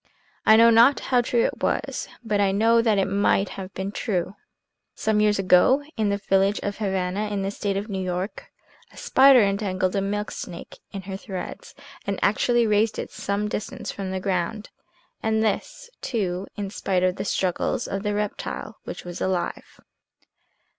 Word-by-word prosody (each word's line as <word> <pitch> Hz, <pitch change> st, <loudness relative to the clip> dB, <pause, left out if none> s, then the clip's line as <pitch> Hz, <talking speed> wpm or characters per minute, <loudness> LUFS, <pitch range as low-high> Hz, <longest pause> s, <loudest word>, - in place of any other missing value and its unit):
I 220 Hz, -, +9 dB
know 230 Hz, +1 st, +7 dB
not 235 Hz, +5 st, +6 dB
how 245 Hz, -, +6 dB
true 235 Hz, 0 st, +1 dB
it -, -, -3 dB
was, -, -, -1 dB, 0.2 s
but 210 Hz, -3 st, 0 dB
I 195 Hz, -1 st, +3 dB
know 225 Hz, +4 st, +4 dB
that 220 Hz, -3 st, +2 dB
it 195 Hz, -, +3 dB
might 200 Hz, 0 st, +2 dB
have 190 Hz, 0 st, -7 dB
been 190 Hz, +1 st, -3 dB
true. 190 Hz, -3 st, -2 dB, 0.6 s
Some 220 Hz, -1 st, +1 dB
years 210 Hz, -1 st, +3 dB
ago, 195 Hz, +9 st, +4 dB
in 215 Hz, -3 st, +1 dB
the 200 Hz, -, +1 dB
village 195 Hz, 0 st, +2 dB
of 205 Hz, +1 st, -3 dB
Havana, 190 Hz, 0 st, -1 dB
in 205 Hz, -2 st, -2 dB
the 195 Hz, -, -2 dB
State 200 Hz, -1 st, -2 dB
of 200 Hz, +2 st, -3 dB
New 195 Hz, -3 st, -3 dB
York, 185 Hz, +3 st, -4 dB, 0.4 s
a -, -, -18 dB
spider 265 Hz, -3 st, +6 dB
entangled 195 Hz, -2 st, 0 dB
a 195 Hz, -, +1 dB
milk 205 Hz, +1 st, -2 dB
snake 175 Hz, -1 st, -8 dB
in 195 Hz, -1 st, -6 dB
her 190 Hz, 0 st, -5 dB
threads, 190 Hz, -3 st, -7 dB, 0.3 s
and -, -, -1 dB
actually 240 Hz, -1 st, +3 dB
raised 215 Hz, +1 st, +2 dB
it -, -, -5 dB
some 200 Hz, +1 st, -2 dB
distance 210 Hz, 0 st, -4 dB
from 195 Hz, -1 st, -5 dB
the 190 Hz, 0 st, -2 dB
ground, 190 Hz, +2 st, -2 dB, 0.5 s
and 220 Hz, 0 st, +1 dB
this, 350 Hz, -, -2 dB
too, 195 Hz, -6 st, -2 dB
in 200 Hz, -2 st, -4 dB
spite 190 Hz, -3 st, -1 dB
of 185 Hz, +1 st, +1 dB
the -, -, -2 dB
struggles 185 Hz, -2 st, -1 dB
of 195 Hz, -, -3 dB
the 210 Hz, 0 st, -1 dB
reptile, 210 Hz, 0 st, -4 dB
which -, -, -7 dB
was 175 Hz, -1 st, -7 dB
alive. 185 Hz, -2 st, -3 dB
200 Hz, 180 wpm, -24 LUFS, 190-215 Hz, 0.6 s, I